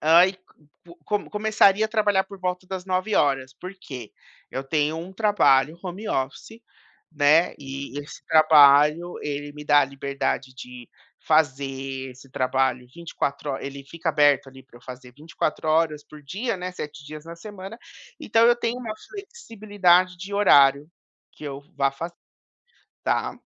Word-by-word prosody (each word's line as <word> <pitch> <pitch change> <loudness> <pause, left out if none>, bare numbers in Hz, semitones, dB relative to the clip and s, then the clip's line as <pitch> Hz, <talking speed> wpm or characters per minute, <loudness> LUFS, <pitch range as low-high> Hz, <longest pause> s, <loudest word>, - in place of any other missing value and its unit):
ah, 165 +4 +6
e 190 - -8 0.7
co 205 +4 -2
começaria 215 -1 +3
a - - -16
trabalhar 210 -3 +2
por 200 - -12
volta 180 0 -3
das 185 -1 -6
9h, 165 -9 0
por 185 +7 -9
quê? 125 - -9 0.4
Eu 130 - -4
tenho 150 +2 0
um 170 +3 -7
trabalho 170 -8 +3
home 190 +3 -6
office, 140 +12 -4 0.5
né, 155 +3 +3
e 135 0 -7
esse 145 +1 -10
trabalho 155 +1 +5
ele 145 0 -5
me 150 0 -10
dá 145 0 +5
a - - +3
liberdade 135 -1 -3
de 125 -1 -11 0.4
fazer 135 -3 0
esse 130 +1 -16
trabalho 130 -1 0
24 150 -4 -4
ho 135 - -4
ele 140 0 -8
fica 165 +4 -5
aberto 145 -3 +3
ali 135 0 -14
para 130 -1 -20
eu - - -27
fazer 125 0 -11
24 155 +2 -4
horas 155 -2 +1
por 150 -1 -14
dia, 200 - -3
né, 180 0 -5
7 150 -4 -8
dias 155 0 -9
na 165 0 -9
semana, 200 +3 -10 0.4
então 225 +1 +3
eu 240 - +6
tenho 240 0 -2
uma 230 -4 -5 0.2
flexibilidade 205 - 0
de 195 +3 -8
horário 140 -7 +5 0.4
que - - -18
eu 140 -1 -6 0.2
vá 135 0 +2
fa 165 +5 -6 0.9
tá. - - -1
155 Hz, 155 wpm, -24 LUFS, 140-190 Hz, 0.9 s, ah